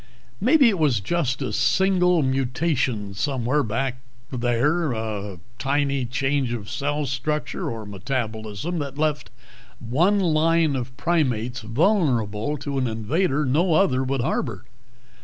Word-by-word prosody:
"Maybe 265 +4 +5
it 200 -6 +1
was 140 -8 +3
just 135 - -1
a 130 - -3
single 180 -3 +3
mutation 130 -5 0
somewhere 130 +5 0
back 125 +2 -2 0.3
there. 130 +7 +1
Just - - -2
a 105 -4 -4 0.2
tiny 140 -1 0
change 135 0 0
of 105 -4 -6
cell 145 +1 -1
structure 140 +4 -2
or 115 -2 -6
metabolism 110 - -3
that 140 -1 -5
left 150 -1 -1 0.5
one 170 - +2
line 165 -3 +2
of 125 0 -5
primates 130 -7 0
vulnerable 120 - +1
to 140 0 -3
an 130 - 0
invader 140 - 0
no 160 +6 +2
other 135 -8 +3
would 135 0 -1
harbor. 115 -4 -2
135 Hz, 130 wpm, -24 LUFS, 120-155 Hz, 0.5 s, Maybe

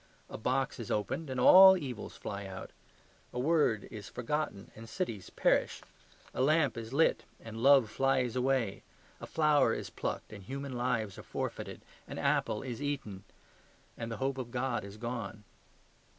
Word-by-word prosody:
A - - -5
box 130 +4 -1
is 115 - -6
opened, 105 +9 -2
and 130 -1 -3
all 190 +8 +9
evils 130 - -6
fly 100 -1 -5
out. 95 -1 -8 0.6
A - - -7
word 145 -6 +2
is 105 -3 -8
forgotten, 125 -4 -3
and 115 +1 -11
cities 110 - -4
perish. - - +1 0.5
A - - -2
lamp 145 -1 +3
is 115 0 -6
lit, 155 +4 +3 0.2
and 115 0 -8
love 135 -2 +6
flies 130 -3 +1
away. 125 -5 0 0.4
A - - -8
flower 150 -2 +3
is - - -6
plucked, - - -4
and 100 - -9
human 135 +5 -5
lives 120 -4 -1
are - - -6
forfeited. - - -5 0.3
An - - -7
apple 105 - 0
is 125 -1 -5
eaten, 135 -10 -4 0.7
and 115 0 -5
the 115 - -4
hope 135 0 -1
of 125 -2 -5
God 125 0 -1
is 100 +1 -9
gone. 115 -2 -5
125 Hz, 165 wpm, -32 LUFS, 110-140 Hz, 0.7 s, all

